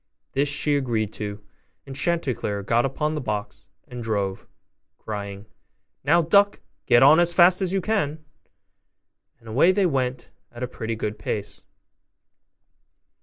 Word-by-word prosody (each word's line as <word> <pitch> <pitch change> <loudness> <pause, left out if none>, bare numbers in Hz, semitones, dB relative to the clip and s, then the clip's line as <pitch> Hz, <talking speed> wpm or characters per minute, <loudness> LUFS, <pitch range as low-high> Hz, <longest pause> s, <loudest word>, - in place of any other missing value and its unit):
This 140 +1 +1
she 145 +1 +1
agreed 115 -6 -1
to 105 -1 -4
do; 105 - -27 0.4
and 135 -1 -9
Chanticleer 130 - -1
got 120 +5 +2
upon 150 +3 -2
the 150 - -3
box, 105 -4 -5 0.2
and 125 -1 -8
drove, 100 -4 -2 0.5
crying, 100 -1 -6 0.6
'Now, 165 +5 +4
duck, 200 +5 +4 0.3
get 120 - +6
on 150 +4 +7
as 175 0 +2
fast 180 +2 +6
as 185 -2 0
you 195 0 0
can.' 155 -8 -1 1.1
And 115 - -19
away 135 +11 +4
they 195 0 +2
went 130 -5 -2 0.2
at 120 +1 -7
a - - -1
pretty 115 -2 -5
good 105 -1 -4
pace. 105 -1 -5
130 Hz, 145 wpm, -24 LUFS, 110-165 Hz, 1.1 s, on